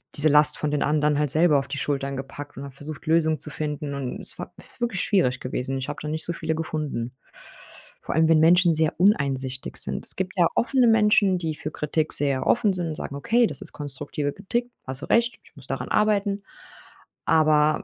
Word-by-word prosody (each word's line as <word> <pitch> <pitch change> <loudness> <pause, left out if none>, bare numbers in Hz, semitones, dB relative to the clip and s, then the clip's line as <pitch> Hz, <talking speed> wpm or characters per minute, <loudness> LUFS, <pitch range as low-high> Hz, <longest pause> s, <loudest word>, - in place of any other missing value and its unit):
diese 150 +1 +2
Last 150 +1 +5
von 150 - -2
den 150 - +1
anderen 150 -1 +2
halt 150 -2 +1
selber 155 -3 +4
auf 135 - -6
die 140 - -5
Schultern 140 -1 -2
gepackt 145 +2 -8
und 135 - -6
habe 140 -2 -9
versucht, 150 +2 -8
Lösungen 160 -1 +2
zu - - -4
finden, 150 -1 -4
und 135 -3 -4
es - - -3
war - - -7
ist - - -15
wirklich 235 -6 -1
schwierig 175 - +1
gewesen. 130 +1 -3
Ich 135 +2 -4
habe 145 - -5
da 150 - -5
nicht 155 +1 -2
so 170 - 0
viele 160 -1 -2
gefunden. 150 -6 -3 0.9
Vor - - -4
allem, 160 0 +4
wenn 160 - +5
Menschen 175 +2 +5
sehr 155 0 +1
uneinsichtig 135 -9 +1
sind. - - -4
Es - - -2
gibt 190 0 -2
ja 175 - +5
offene 250 0 +3
Menschen, 210 -4 +4
die 160 -3 -3
für 155 - -6
Kritik 155 +1 -1
sehr 140 -2 -1
offen 215 -3 +3
sind, 170 -4 -3
sagen: 140 - -6
„Okay, 235 +9 +3
das - - -6
ist - - -9
konstruktive 145 0 -4
Kritik, 240 +5 -3 0.2
hast 130 +1 -4
du - - -5
recht, 235 -1 +2
ich - - -22
muss 135 -2 -7
daran 135 - -4
arbeiten.“ 205 -1 +1 0.8
Aber, 155 -1 +3
155 Hz, 210 wpm, -24 LUFS, 140-180 Hz, 0.9 s, Last